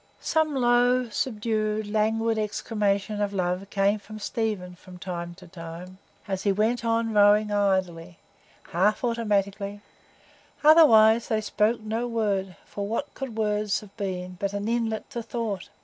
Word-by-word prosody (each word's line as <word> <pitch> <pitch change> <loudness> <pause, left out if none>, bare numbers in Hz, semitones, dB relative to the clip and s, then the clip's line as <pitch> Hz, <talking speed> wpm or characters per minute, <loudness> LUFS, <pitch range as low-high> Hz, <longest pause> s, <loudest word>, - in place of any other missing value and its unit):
Some 315 -2 0
low, 245 0 +3
subdued, 215 -2 -1
languid 220 +1 0
exclamation 210 -1 -1
of 205 -1 -1
love 185 +1 -2
came 200 +1 +1
from 215 +2 -10
Stephen 210 -4 -3
from 180 +1 -14
time 175 -1 -6
to 185 0 -14
time, 170 +2 -10 0.3
as 190 -1 -2
he 200 - +2
went 220 +5 0
on 230 -1 0
rowing 210 +1 +5
idly, 185 -4 0 0.5
half 200 +7 +2
automatically; 205 -3 -1 0.8
otherwise 235 -8 +7
they 220 -3 +1
spoke 215 +2 0
no 225 +3 -2
word; 200 -5 -1
for 200 -1 -5
what 230 +7 -3
could 260 -5 -6
words 210 -1 0
have 205 -2 -15
been 185 -2 -4
but 200 0 -2
an 205 +1 -3
inlet 230 -2 -1
to 235 - -4
thought? 225 -5 -4
210 Hz, 145 wpm, -26 LUFS, 195-225 Hz, 0.8 s, otherwise